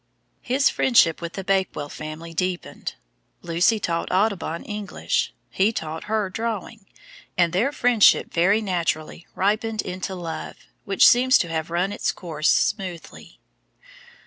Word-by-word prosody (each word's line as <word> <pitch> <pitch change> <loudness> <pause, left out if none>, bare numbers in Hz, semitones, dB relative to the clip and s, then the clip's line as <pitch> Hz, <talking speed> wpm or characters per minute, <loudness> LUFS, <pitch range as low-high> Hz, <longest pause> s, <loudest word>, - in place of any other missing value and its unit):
His 270 +3 +2
friendship 185 -11 +3
with 170 0 -5
the 195 - -5
Bakewell 190 -6 0
family 155 +3 -8
deepened. 180 +1 -3 0.5
Lucy 175 +6 +2
taught 170 -4 -2
Audubon 185 -4 0
English, 210 -1 -2 0.2
he 200 +3 +2
taught 160 -6 -5
her 215 -2 0
drawing, 220 0 -5 0.5
and 175 -1 +3
their 230 +10 +2
friendship 245 -6 +4
very 195 +6 +3
naturally 170 -4 -2
ripened 215 +2 0
into 185 +1 -5
love, 170 -3 -6 0.3
which 195 -1 +5
seems 255 +2 +5
to 170 - -2
have 160 0 -3
run 175 +4 0
its - - -1
course 160 -3 -2
smoothly. 185 -5 -2
185 Hz, 130 wpm, -23 LUFS, 170-215 Hz, 0.5 s, which